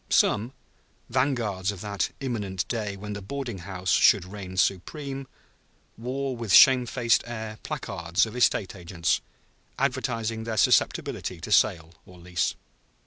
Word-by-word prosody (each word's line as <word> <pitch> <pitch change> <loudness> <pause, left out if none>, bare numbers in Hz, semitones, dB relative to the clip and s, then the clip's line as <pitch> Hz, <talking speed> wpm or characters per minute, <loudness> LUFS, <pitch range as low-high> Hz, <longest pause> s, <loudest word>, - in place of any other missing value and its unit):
Some, 115 +5 +2 0.6
vanguards 115 -8 0
of 100 -3 -9
that 100 -3 -2
imminent 105 -8 -3
day 105 -4 -3
when 105 +1 -6
the 105 - -6
boarding 120 -1 -5
house 90 0 -3
should 100 -4 +5
reign 95 -1 -8
supreme, 135 - -1 0.7
wore 130 +3 -3
with 115 -4 -4
shamefaced 125 -1 +6
air 110 -2 -6
placards 85 +3 -1
of 110 +1 -9
estate 115 -5 +2
agents, 85 -1 -1 0.6
advertising 115 0 -1
their 110 -1 -4
susceptibility - - +1
to - - -7
sale 80 0 +3
or 90 - -14
lease. 90 0 -1
105 Hz, 130 wpm, -26 LUFS, 95-120 Hz, 0.7 s, shamefaced